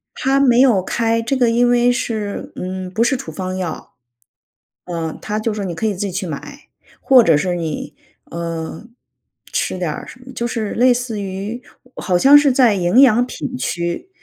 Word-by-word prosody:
他 270 +1 +1
没 250 -3 +4
有 230 -8 +4
开， 230 +3 0
这 240 +4 -1
个 245 -3 +3
因 240 +1 +3
为 245 0 +3
是， 215 -4 -3
嗯， 185 0 -5
不 220 +4 +1
是 265 - +2
处 160 - -8
方 185 +3 -5
药。 175 -4 -6 0.9
呃， 165 -3 -4
他 210 0 -3
就 215 0 -2
说 210 -1 -4
你 180 -3 -4
可 220 - -3
以 215 - +1
自 185 - -10
己 190 - -5
去 190 +2 -3
买， 275 - -8 0.3
或 255 -3 +6
者 160 -6 +4
是 180 +3 -1
你， 160 -3 -4 0.3
呃， 165 0 -6 0.7
吃 - - -1
点 175 -4 -2
儿 - - -7
什 - - -12
么 260 +1 -12
就 235 -1 -2
是 225 -3 -3
类 250 +2 +3
似 240 -4 -4
于 200 +5 -5 0.4
好 180 -2 0
像 275 +10 +6
是 290 -1 +4
在 250 -4 +4
营 185 +6 +3
养 245 -2 +5
品 255 0 -6
区 175 - -3
215 Hz, 205 characters per minute, -18 LUFS, 180-245 Hz, 0.9 s, 或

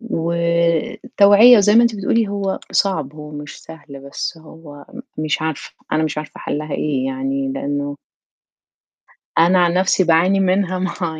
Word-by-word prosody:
والتوعية 170 +5 +3
زَي 210 +2 +3
ما 235 - +6
أنتِ 235 -2 +1
بتقولي، 210 +2 0
هو 200 -1 -3
صعب، 155 -8 -1
هو 150 -1 -10
مش 145 -1 -10
سهل، 145 -4 -12
بس 160 - -5
هو 155 -2 -14 0.3
م 155 - -2
مش 155 +1 -1
عارفة، 160 -2 -5 0.2
أنا 155 - +1
مش 150 -1 -3
عارفة 150 - -9
حَلّها 150 +1 -4
إيه؟ 135 -4 -2
يعني 135 0 -3
لأنه 145 +1 -4 1.4
أنا 175 +3 +4
عن 170 -1 +1
نفسي 185 +1 +2
باعاني 175 +3 +2
منها 185 -1 0
مع 175 -4 -4
165 Hz, 150 wpm, -18 LUFS, 150-190 Hz, 1.4 s, ما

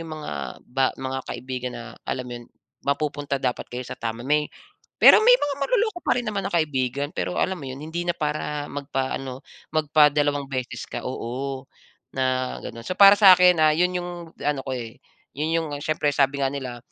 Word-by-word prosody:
'yung 165 - -7
mga 155 -1 -6 0.3
ba 130 +1 +1
mga 130 0 -4
kaibigan 125 -1 -5
na 120 - -7 0.2
alam 125 - -2
mo 125 - -8
'yon, 120 - -15 0.3
mapupunta 145 0 -1
dapat 130 -2 -3
kayo 125 +1 -5
sa - - -7
tama, 115 0 -5
may 150 +1 +1 0.5
pero - - +9
may - - +7
mga 290 - -2
manloloko 430 - +1
pa - - +1
rin 245 - -1
naman 200 -2 -2
na 200 - -5
kaibigan, 140 -3 0
pero - - -3
alam 190 0 0
mo 140 - -8
'yon, 130 0 -6
hindi 160 +3 -4
na 175 - +2
para 150 -1 -2
magpa-ano, 135 -2 -4 0.3
magpadalawang 150 -2 +3
beses 130 -2 -4
ka, - - -6
oo, 135 +3 -4 0.5
na 130 -1 0
gano'n. 115 - -8
So, 185 - -2
para 200 0 +9
sakin, 180 -3 +7
ah, 155 0 +5
'yon 180 +2 +2
'yung 175 0 -5 0.3
ano 145 -2 0
ko, 135 - -4
eh. 115 -3 -6 0.4
'Yon 155 +3 -1
'yung 165 -2 0
siyempre, 155 -1 0
sabi 140 0 +2
nga 135 - +2
nila, 130 -3 -5
145 Hz, 190 wpm, -24 LUFS, 130-160 Hz, 0.5 s, pero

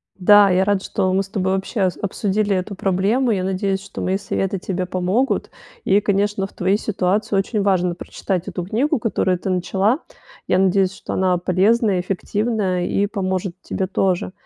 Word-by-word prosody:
Да, 205 +1 +6
я 185 0 +3
рада, 200 -1 +1
что 190 -2 -1
мы 190 - +2
с 195 - -7
тобой 190 -2 -1
вообще 195 +2 -1
ос 180 - -1
обсудили 200 0 0
эту 185 +2 -3
проблему. 200 +8 +1
Я 190 -4 0
надеюсь, 190 +1 -1
что 200 - -8
мои 190 +1 0
советы 195 0 -2
тебе 185 0 -3
помогут. 185 +9 0 0.3
И, 200 +2 +4
конечно, 200 -1 0
в - - -22
твоей 190 +3 +1
ситуации 200 0 0
очень 200 +2 0
важно 185 -3 +1
прочитать 180 +1 -4
эту 180 -2 -4
книгу, 235 +10 0
которую 190 -5 0
ты 185 - -4
начала. 195 - +1 0.5
Я - - +2
надеюсь, 190 0 +2
что - - -6
она 185 -1 +2
полезная, 195 +3 +2
эффективная 195 0 -1
и 200 - +1
поможет 190 -3 -2
тебе 190 - -3
тоже. 185 -1 0
195 Hz, 175 wpm, -20 LUFS, 185-205 Hz, 0.5 s, Да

